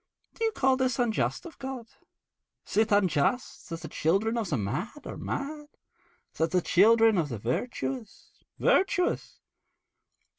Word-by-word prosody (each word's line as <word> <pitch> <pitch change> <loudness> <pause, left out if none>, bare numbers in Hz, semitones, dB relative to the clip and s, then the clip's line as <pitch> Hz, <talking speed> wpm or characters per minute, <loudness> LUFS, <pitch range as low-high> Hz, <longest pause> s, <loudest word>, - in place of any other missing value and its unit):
Do - - -5
you 450 - +2
call 265 -6 +2
this 255 -2 0
unjust 240 +5 0
of 340 - -11
God? 265 -3 -5 0.8
Is - - -7
it 220 +1 +3
unjust 200 - +1
that 165 0 -5
the 160 - -6
children 195 +9 +1
of 225 -6 -2
the 150 - 0
mad 180 - -4
are - - -6
mad, 295 +1 -4 0.7
and 165 +1 +2
the 185 - +2
children 220 +4 +5
of 155 -3 -1
the 120 - -4
virtuous 220 - -4 0.3
virtuous.' 370 -2 +1
225 Hz, 145 wpm, -28 LUFS, 170-260 Hz, 0.8 s, children